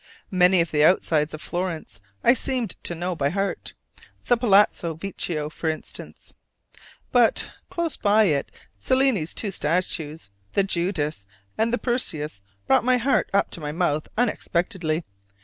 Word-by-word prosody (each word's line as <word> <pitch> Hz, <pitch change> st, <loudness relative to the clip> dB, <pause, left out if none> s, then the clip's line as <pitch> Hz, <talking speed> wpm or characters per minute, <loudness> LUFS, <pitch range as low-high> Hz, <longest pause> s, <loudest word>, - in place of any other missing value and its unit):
Many 180 Hz, -1 st, +5 dB
of 165 Hz, -, -2 dB
the 150 Hz, -1 st, +3 dB
outsides 155 Hz, -2 st, +3 dB
of 155 Hz, -, -11 dB
Florence 170 Hz, -, -4 dB, 0.2 s
I 240 Hz, -, +7 dB
seemed 255 Hz, -2 st, -2 dB
to 175 Hz, -, 0 dB
know 175 Hz, +2 st, -3 dB
by 140 Hz, -3 st, 0 dB
heart 195 Hz, +3 st, -3 dB, 0.5 s
the 245 Hz, -, +4 dB
Palazzo 205 Hz, -7 st, +3 dB
Vecchio 165 Hz, -3 st, -3 dB
for 160 Hz, +1 st, -3 dB
instance. 155 Hz, -, -8 dB, 0.8 s
But 240 Hz, -2 st, +3 dB, 0.2 s
close 340 Hz, -2 st, -2 dB
by 210 Hz, +1 st, +4 dB
it 150 Hz, -8 st, +1 dB, 0.3 s
Cellini's 260 Hz, -, +1 dB
two 205 Hz, -, -1 dB
statues, 160 Hz, -, -2 dB, 0.2 s
the 200 Hz, -, +3 dB
Judith 170 Hz, -, -2 dB, 0.3 s
and 225 Hz, +1 st, +1 dB
the 245 Hz, -, +1 dB
Perseus, 160 Hz, -, -1 dB, 0.2 s
brought 135 Hz, -, +4 dB
my 255 Hz, +1 st, +3 dB
heart 260 Hz, +3 st, +1 dB
up 200 Hz, -, +1 dB
to 170 Hz, -, -8 dB
my 150 Hz, -1 st, -3 dB
mouth 155 Hz, -2 st, 0 dB
unexpectedly. 175 Hz, -7 st, 0 dB
180 Hz, 145 wpm, -24 LUFS, 155-220 Hz, 0.8 s, I